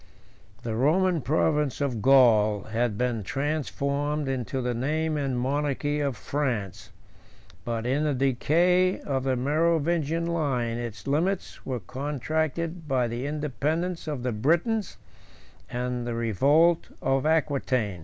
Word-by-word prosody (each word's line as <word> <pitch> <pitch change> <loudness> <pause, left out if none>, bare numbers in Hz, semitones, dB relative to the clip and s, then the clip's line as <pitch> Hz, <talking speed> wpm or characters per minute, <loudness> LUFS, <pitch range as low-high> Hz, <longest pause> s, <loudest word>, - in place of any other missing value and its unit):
The 115 - -3
Roman 165 +8 +2
province 150 +1 +1
of 130 -6 -1
Gaul 110 -6 +5
had 115 -1 -1
been 125 -2 0
transformed 145 +3 -2
into 130 -1 -2
the 125 -1 -1
name 155 +6 -1
and 135 -4 -1
monarchy 145 +2 -1
of 140 -5 -1
France; 120 -9 -3 0.8
but, 115 -1 -2
in 135 +4 +1
the 150 -2 +1
decay 170 +8 +2
of 135 -2 -2
the 130 -1 +1
Merovingian 160 +3 +1
line, 135 -9 -1
its 120 -3 -6
limits 170 +7 -1
were 125 -4 -2
contracted 155 - -3
by 130 -3 +1
the 120 +4 -4
independence 155 +4 -2
of 145 -5 -3
the 125 - 0
Britons 170 - 0 0.7
and 125 -1 -3
the 120 - -2
revolt 140 - +3 0.2
of 135 +2 +1
Aquitain. 135 - 0
140 Hz, 125 wpm, -26 LUFS, 125-155 Hz, 0.8 s, Gaul